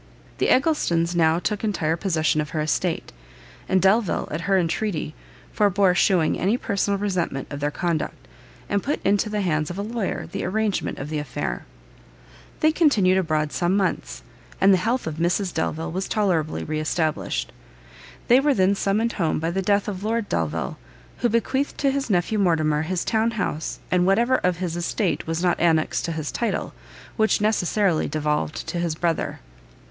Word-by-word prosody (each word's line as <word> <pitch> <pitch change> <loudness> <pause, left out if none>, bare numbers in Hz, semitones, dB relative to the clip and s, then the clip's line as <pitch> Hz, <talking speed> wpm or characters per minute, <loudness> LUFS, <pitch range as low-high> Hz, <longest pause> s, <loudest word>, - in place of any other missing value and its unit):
The - - +2
Egglestons 175 - +2
now 160 -1 +3
took 205 +4 -2
entire 165 -7 0
possession 160 -4 +1
of 150 - -5
her - - +1
estate, 150 - -1 0.6
and 190 - +4
Delvile, 195 +2 +2
at 165 +5 -4
her 195 - +4
entreaty, 170 -2 -1 0.4
forbore 200 -3 +3
shewing 180 -3 +2
any 205 +6 +2
personal 200 -3 0
resentment 180 -9 -2
of 145 - -5
their 145 +1 0
conduct, 170 +1 -2 0.5
and 200 - 0
put 290 - -1
into 205 +2 +2
the 210 -1 -1
hands 155 -5 0
of 175 - -6
a 200 - -2
lawyer 225 -1 -3
the - - -5
arrangement 215 0 -1
of 135 - -6
the 155 -1 -2
affair. 60 - -4 0.9
They 310 - +5
continued 210 - +3
abroad 155 -4 0
some 175 +2 +1
months, 190 -3 -2 0.4
and 195 +1 +6
the 185 - +3
health 235 +7 0
of 160 -1 -4
Mrs 175 +3 0
Delvile 160 +1 -2
was 190 +3 -3
tolerably 180 -8 0
re 155 0 -3
established. 155 0 -1 0.8
They 245 +1 +6
were 285 0 +2
then 190 0 +3
summoned 205 +4 0
home 165 -5 0
by 165 +2 -1
the 190 +2 -1
death 200 +1 +1
of 195 -2 -4
Lord 225 0 -1
Delvile, 80 -4 -2 0.4
who 240 - +1
bequeathed 260 +5 0
to 275 -1 +2
his 275 -2 -2
nephew 195 +3 +1
Mortimer 155 -5 +2
his 175 +2 -2
town 220 0 +2
house, 160 -6 -2
and 180 0 +3
whatever 235 +7 +3
of 180 -1 0
his 175 -2 -3
estate 175 +2 -1
was 165 +2 -2
not 175 -2 +2
annexed 160 -2 +2
to 170 - -2
his 155 -2 -4
title, 235 - -2 0.4
which 220 0 +3
necessarily 205 -4 +1
devolved 150 - -2
to 175 - -3
his 170 -2 -1
brother. 165 0 -1
185 Hz, 175 wpm, -23 LUFS, 160-210 Hz, 0.9 s, and